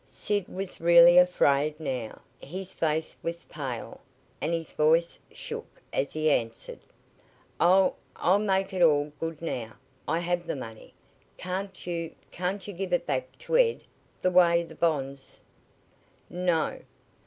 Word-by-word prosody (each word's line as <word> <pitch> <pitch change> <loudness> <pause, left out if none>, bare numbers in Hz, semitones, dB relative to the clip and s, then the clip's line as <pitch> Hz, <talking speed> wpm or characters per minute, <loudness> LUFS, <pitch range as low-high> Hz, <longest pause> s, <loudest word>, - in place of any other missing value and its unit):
Sid 205 -3 -2
was 190 -2 -6
really 170 +1 +8
afraid 150 -4 +3
now. 130 -7 -4 0.2
His 185 +5 -7
face 160 0 -1
was 170 0 -4
pale, 130 -6 -6 0.4
and - - -1
his 165 -2 -3
voice 165 +2 +2
shook - - -8
as 140 - 0
he 155 0 +2
answered: 115 -4 -2 0.8
"I'll 185 +2 +5 0.2
I'll 185 +4 +3
make 195 -1 0
it 185 - -1
all 150 -3 +4
good 165 -1 -5
now. 120 -8 -4 0.3
I 160 - +1
have 175 0 -1
the - - -2
money. 115 -5 -9 0.4
Can't 190 +1 -5
you 170 -2 -4 0.2
can't 185 +3 -3
you 205 - -6
give 185 0 -4
it 175 - +1
back 130 -1 -3
to - - 0
Ed, 475 -2 +3 0.4
the 185 - +3
way 170 -1 +5
the 165 - -11
bonds 140 -5 -2 0.5
" - - -36
"No!" 175 -3 0
170 Hz, 145 wpm, -28 LUFS, 150-180 Hz, 0.8 s, really